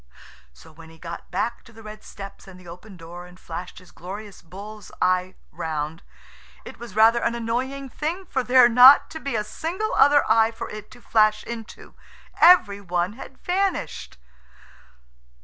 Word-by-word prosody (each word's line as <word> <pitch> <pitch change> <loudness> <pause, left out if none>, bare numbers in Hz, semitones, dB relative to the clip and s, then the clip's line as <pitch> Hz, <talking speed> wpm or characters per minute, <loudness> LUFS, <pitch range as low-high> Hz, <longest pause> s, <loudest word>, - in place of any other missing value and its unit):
So 60 - -18
when 160 +1 -15
he 160 - -16
got 170 0 -9
back 235 +2 -3
to - - -16
the 225 0 -15
red 215 0 -11
steps 195 -1 -11
and 185 -1 -13
the 180 - -16
open 180 +3 -12
door 175 +1 -11
and 180 +1 -17
flashed 175 +2 -8
his 185 -1 -15
glorious 200 +3 -10
bull's 200 +4 -11
eye 185 0 0 0.2
round 155 0 -5 0.6
it - - -11
was 235 -5 -10
rather 225 +2 +5
an 235 - -1
annoying 255 +4 -3
thing 335 +8 -4
for 265 - -2
there 250 0 +6
not 250 +4 +7
to 320 - -7
be 275 -5 -4
a 210 - 0
single 345 - -4
other 285 +1 +5
eye 225 0 +4
for 225 - -8
it 215 0 -9
to 245 - -16
flash 215 -1 +2
into. 230 -1 -9 0.5
Every 220 - +5
one 180 0 -2
had 265 +2 -12
vanished. 380 +1 -3
215 Hz, 170 wpm, -23 LUFS, 180-245 Hz, 0.6 s, not